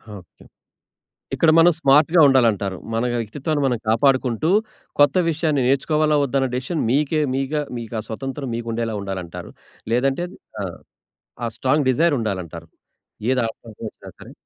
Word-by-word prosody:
Okay. 90 -3 -15 0.9
ఇక్కడ 165 - +4
మనం 170 +2 +7
స్మార్ట్‌గా 155 +4 +5
ఉండాలంటారు. 110 -8 +2 0.2
మన 115 +1 0 0.2
వ్యక్తిత్వాన్ని 145 +7 -2
మనం 125 -3 +1
కాపాడుకుంటూ, 130 +4 +2 0.5
కొత్త 145 -1 +5
విషయాన్ని 155 -3 0
నేర్చుకోవాలా, 150 +3 +2
వద్దా 140 0 -1
అనే 130 - 0
డిసిషన్ 135 +6 -2
మీకే 150 +4 +1
మీగా 135 +3 -1 0.2
మీకా 115 -1 -5
స్వతంత్రం 135 +3 -5
మీకుండేలా 115 -1 -3
ఉండాలంటారు. 95 -3 -6 0.4
లేదంటే 135 +7 +1 0.4
ఆ! - - -2 0.8
ఆ - - 0
స్ట్రాంగ్ 135 +2 +1
డిజైర్ 160 +5 +2
ఉండాలంటారు. 90 -6 -4 0.6
ఏది 130 -1 +2
ఆటంకం 115 0 -10
వచ్చినా - - -14
సరే. - - -12
130 Hz, 130 wpm, -21 LUFS, 115-150 Hz, 0.9 s, మనం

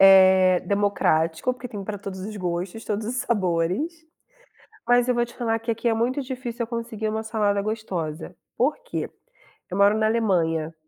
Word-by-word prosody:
é 190 -1 +7
democrático, 180 -2 +1
porque 250 0 -8
tem 205 -3 -6
pra 205 +1 -4
todos 195 -1 -7
os 210 +2 -6
gostos, 180 +3 -3
todos 210 +1 -2
os 250 +2 -3
sabores, 210 - 0 0.8
mas 245 0 +4
eu 250 - +3
vou 240 0 +2
te 240 - -13
falar 225 -2 0
que 230 +1 -3
aqui 230 +1 -3
é 225 - +2
muito 245 +5 0
difícil 250 -2 -4
eu - - -9
conseguir 230 -2 -3
uma 220 +1 -2
salada 210 -2 0
gostosa. 185 -7 -4 0.2
Porque - - -1 0.6
eu 180 - -3
moro 200 +1 +5
na 220 0 +2
Alemanha 165 -8 +1
215 Hz, 170 wpm, -24 LUFS, 185-235 Hz, 0.8 s, é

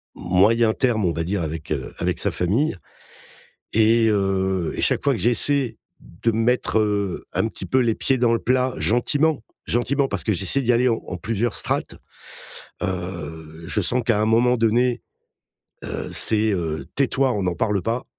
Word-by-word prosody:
moyen 105 +6 +2
terme 110 -6 +1
on 85 - +1
va 80 +2 -2
dire 95 +1 -2
avec 80 0 -6
heu, 65 -5 -3
avec - - -1
sa - - 0
famille, 100 - 0 1.0
et 115 +1 +4
heu, 95 -3 0
et - - -3
chaque - - +2
fois 140 - +3
que 115 - -4
j'essaie 120 +1 +2 0.2
de 115 +7 -3
mettre, 115 0 +1
heu, 100 -3 -1
un - - +1
petit - - -7
peu 130 - +1
les 115 -3 +1
pieds 135 -1 +1
dans 115 -1 +3
le 115 - +1
plat 130 +1 0
gentiment, 145 +4 +1 0.2
gentiment 135 +4 0
parce - - -1
que 110 - +1
j'essaie 95 +10 0
d'y 125 -1 +2
aller 125 +2 +3
en 110 -5 -3
plusieurs 115 +5 -2
strates, - - -2 0.9
heu, 85 -4 -6
je 105 - -1
sens 125 +7 +1
qu'à 115 -3 +2
un 105 - +2
moment 120 +3 +3
donné, 120 +2 +1 0.8
heu, - - -5
c'est 110 0 +2
heu: 80 -6 -3
«Tais-toi! 135 -1 +2
On 100 -2 -2
n'en 90 - 0
parle 105 -1 0
pas», 115 +3 -2
110 Hz, 175 wpm, -22 LUFS, 95-125 Hz, 1.0 s, et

